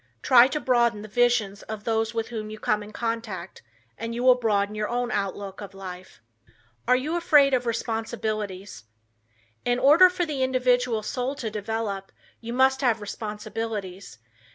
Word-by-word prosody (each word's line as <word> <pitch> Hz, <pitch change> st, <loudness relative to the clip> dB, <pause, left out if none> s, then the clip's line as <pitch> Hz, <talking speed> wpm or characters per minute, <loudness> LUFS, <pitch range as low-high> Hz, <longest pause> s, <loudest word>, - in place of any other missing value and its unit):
Try 250 Hz, -3 st, +7 dB
to 300 Hz, +3 st, -2 dB
broaden 235 Hz, -5 st, +1 dB
the -, -, -8 dB
visions 225 Hz, -3 st, +1 dB
of 215 Hz, -1 st, -7 dB
those 225 Hz, 0 st, 0 dB
with 225 Hz, -1 st, -3 dB
whom 215 Hz, -3 st, -5 dB
you 215 Hz, -, -7 dB
come 215 Hz, -2 st, 0 dB
in 210 Hz, 0 st, -10 dB
contact 230 Hz, +1 st, -4 dB, 0.4 s
and 230 Hz, +1 st, -4 dB
you 240 Hz, -, -3 dB
will 255 Hz, 0 st, +8 dB
broaden 210 Hz, -4 st, 0 dB
your 210 Hz, 0 st, -3 dB
own 245 Hz, 0 st, -1 dB
outlook 195 Hz, 0 st, -3 dB
of 200 Hz, -1 st, -9 dB
life. 185 Hz, -5 st, -10 dB, 0.7 s
Are 250 Hz, -, +5 dB
You 295 Hz, +6 st, -1 dB
Afraid 295 Hz, -5 st, +4 dB
of 245 Hz, -1 st, +1 dB
Responsibilities? 215 Hz, -, -3 dB, 0.8 s
In 245 Hz, 0 st, +1 dB
order 305 Hz, +8 st, +7 dB
for 360 Hz, -1 st, -1 dB
the 295 Hz, -4 st, -3 dB
individual 250 Hz, -3 st, +1 dB
soul 255 Hz, +5 st, -3 dB
to 230 Hz, -6 st, -4 dB
develop, 210 Hz, -2 st, -4 dB, 0.3 s
you 230 Hz, 0 st, -7 dB
must 265 Hz, +2 st, +3 dB
have 240 Hz, -4 st, +2 dB
responsibilities. 210 Hz, -, -6 dB
225 Hz, 160 wpm, -25 LUFS, 210-250 Hz, 0.8 s, will